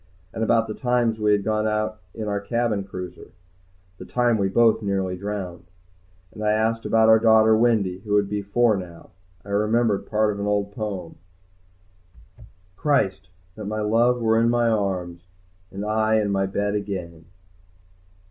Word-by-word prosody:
And 110 - -2
about 115 0 +2
the 110 - -4
times 120 -2 0
we 105 0 +2
had 100 -1 +2
gone 110 0 0
out 110 0 -2 0.2
in 110 -1 -5
our 100 -1 -1
cabin 115 -2 -1
cruiser, 90 -2 -9 0.7
the - - -8
time 120 -3 +1
we 95 -1 +1
both 115 +2 +3
nearly 95 -2 -1
drowned. 95 -3 -6 0.7
And 110 - -10
asked 110 +2 0
about 110 0 +4
our 110 0 +6
daughter 110 -1 +5
Wendy, 110 -5 +1
who 105 0 -5
would 105 -1 +3
be 105 0 -3
four 110 +3 +2
now. 90 -3 -9 0.3
I - - -12
remembered 105 +1 +1
part 105 -1 +1
of 100 - -8
an 100 - -2
old 100 -1 0
poem: 100 -6 -6 1.6
Christ! 95 -8 0 0.2
That 105 +1 -8
my 110 +1 -3
love 115 +4 +2
were 110 -1 +2
in 115 - +3
my 120 -1 +2
arms, 90 -5 -2 0.4
And 100 +2 -6
I 110 +1 +1
in 105 -2 +1
my 95 0 0
bed 100 +1 -2
again! 90 -5 -5
105 Hz, 165 wpm, -23 LUFS, 100-110 Hz, 1.6 s, our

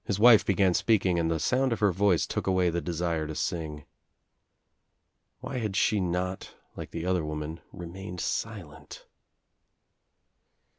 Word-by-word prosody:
His 100 - -2
wife 115 -1 +8
began 95 -2 +2
speaking 95 -4 +2
and 80 -1 0
the 80 -1 0
sound 130 - +1
of 115 - -1
her 105 -2 +3
voice 95 -1 +2
took - - -4
away 95 -2 +2
the 85 +1 -2
desire 85 -2 -2
to 80 - -6
sing. 75 -4 -3 1.6
Why 130 - -4
had 105 -4 -3
she 105 +1 +2
not, 90 +1 -3 0.2
like - - -7
the 85 +1 -5
other 90 -2 +1
woman, 75 +1 -5
re 90 - -8
mained 90 +1 -8
silent? 95 -7 -5
90 Hz, 150 wpm, -28 LUFS, 85-100 Hz, 1.6 s, wife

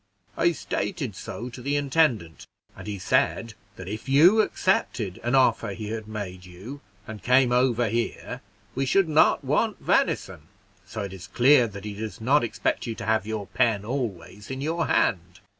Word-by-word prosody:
I 170 +1 +2
stated 140 - -4
so 120 +6 -7
to 125 +1 -10
the 140 +3 -1
intendant, 135 - 0 0.3
and - - -10
he 105 -1 -4
said 115 +2 0 0.2
that 95 - -9
if 110 +6 -6
you 175 +11 +6
accepted 120 - -1
an 120 +3 +1
offer 130 -6 +2
he 105 -2 -6
had 110 -1 -5
made 100 -4 -6
you, 95 +11 -10 0.2
and 110 -1 -8
came 125 0 +4
over 125 -1 +2
here, 120 +2 -3 0.3
we 135 +1 -1
should 195 +6 +3
not 155 -1 +3
want 185 - 0
venison; 75 - 0 0.4
so 105 +1 -5
it 100 -1 -6
is 95 -1 -10
clear 125 +3 +5
that 100 -1 -9
he 105 - -5
does 105 -2 -6
not 135 +6 +3
expect 120 - -2
you 115 - -3
to 115 - -7
have 110 -1 +1
your 110 -2 -3
pen 110 -5 0
always 105 -6 -5
in 130 0 -5
your 160 +3 -1
hand." 90 0 0
115 Hz, 175 wpm, -25 LUFS, 105-135 Hz, 0.4 s, you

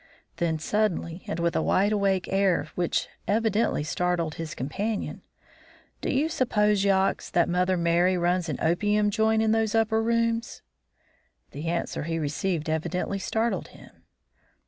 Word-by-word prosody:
Then 165 -2 0
suddenly, 180 -1 -1
and - - -3
with 170 0 0
a - - +2
wide 200 +3 +2
awake 195 -3 +1
air 190 -6 +2
which 175 -1 -1 0.2
evidently 220 -5 +1
startled 170 0 -1
his 165 0 -6
companion: 200 - -3 0.8
"Do - - -2
you 280 +4 +2
suppose, 210 -10 +1
Yox, 195 -1 +1
that 175 - +2
Mother 180 +1 +1
Merry 170 +2 +2
runs 175 0 0
an 145 - -2
opium 205 +5 +2
joint 220 +1 +2
in 220 - +2
those 225 -1 +1
upper 220 0 +2
rooms?" 230 0 0 0.9
The 150 +4 -6
answer 170 0 -2
he 165 0 -2
received 160 +2 -2
evidently 175 +5 -2
startled 225 +4 -1
him. - - -15
190 Hz, 145 wpm, -26 LUFS, 170-220 Hz, 0.9 s, a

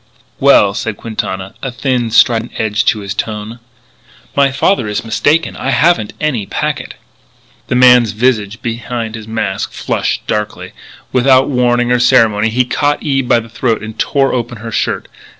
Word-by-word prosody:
"Well," 120 -7 +5
said 105 +1 -4
Quintana, 95 -4 -5
a 135 - -4
thin, 125 -2 -1
strident 115 +1 +3
edge 110 -1 0
to 105 - +1
his 100 0 -4
tone. 110 +2 -5 0.8
"My 140 -1 +3
father 135 - +1
is 105 +2 -3
mistaken. 155 +8 +1
I 135 - -3
haven't 145 -6 +2
any 130 -10 -1
packet." - - -3 0.7
The - - -1
man's 125 -2 +6
visage 110 -2 0
behind 115 -1 -4
his 110 -1 -8
mask 110 -4 -3
flushed - - -2
darkly. 105 0 -3 0.4
Without 130 +1 +4
warning 120 -1 +1
or 125 - +3
ceremony 115 -4 +3
he 125 +3 +1
caught 145 +3 0
Eve 135 -4 0
by 120 - +4
the 115 - -12
throat 115 0 -1
and 110 +1 -6
tore 135 -1 +1
open 120 -1 -3
her 115 +1 -7
shirt. - - -2
120 Hz, 160 wpm, -14 LUFS, 110-130 Hz, 0.8 s, man's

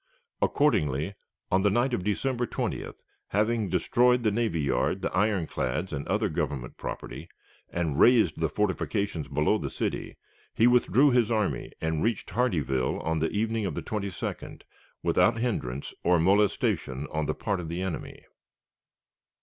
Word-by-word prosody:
Accordingly, 80 - +1 0.4
on 95 - +4
the 105 - +4
night 120 +5 +1
of 95 - -1
December 120 +4 -1
20th, - - -4 0.2
having 110 0 +1
destroyed 120 +8 +3
the 110 - +3
navy 110 -6 0
yard, 70 -2 0
the - - -1
ironclads, 90 - 0
and 70 -1 -4
other 105 +2 +1
Government 70 -7 -3
property, - - -7 0.4
and 80 -4 -2
razed 115 -10 +5
the 80 -1 +1
fortifications 100 -2 -1
below 75 +2 +1
the - - -3
city, - - -3 0.4
he 115 - +4
withdrew 125 +3 +5
his 120 -3 +3
army 105 - -1
and 80 -1 -1
reached 115 -2 -1
Hardeeville 75 - 0
on 80 0 -1
the 80 +1 +1
evening 110 0 -1
of - - -4
the - - -4
22d, 100 -5 -5 0.4
without 115 - +3
hindrance 70 - -2
or 90 +1 +4
molestation 85 -7 +1
on 80 -1 -1
the - - -1
part 100 -2 -2
of 85 -3 -5
the 85 +3 -3
enemy. 95 -4 -5
95 Hz, 150 wpm, -27 LUFS, 80-115 Hz, 0.4 s, razed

